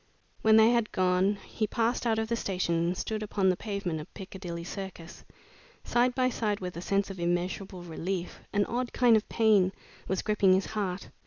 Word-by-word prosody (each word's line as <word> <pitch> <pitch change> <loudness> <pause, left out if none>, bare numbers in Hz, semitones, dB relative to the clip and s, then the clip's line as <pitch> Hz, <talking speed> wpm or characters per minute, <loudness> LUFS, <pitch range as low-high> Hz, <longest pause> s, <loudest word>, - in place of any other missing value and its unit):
When 220 0 +6
they 220 +1 +7
had 235 -2 +1
gone, 185 +2 +2
he 215 - -2
passed 235 +3 0
out 225 -1 +2
of 220 0 0
the 235 - 0
station 185 -6 -1
and 170 +2 0
stood 215 -1 -3
upon 200 -2 +1
the 185 - +3
pavement 190 -5 -3
of 150 - -12
Piccadilly 185 -4 -7
Circus. 180 -2 -8 0.6
Side 245 +1 +2
by 255 -1 +3
side 215 -4 -1
with 180 -1 -5
a 170 - -5
sense 195 +1 0
of 190 - -9
immeasurable 175 +2 -2
relief, 175 +2 -4
an 205 -1 +2
odd 245 +1 -3
kind 240 -2 +5
of 215 - 0
pain 210 -5 +4 0.4
was 190 0 -1
gripping 205 -3 +4
his 190 +1 +2
heart. 195 -3 -3
195 Hz, 190 wpm, -29 LUFS, 180-220 Hz, 0.6 s, they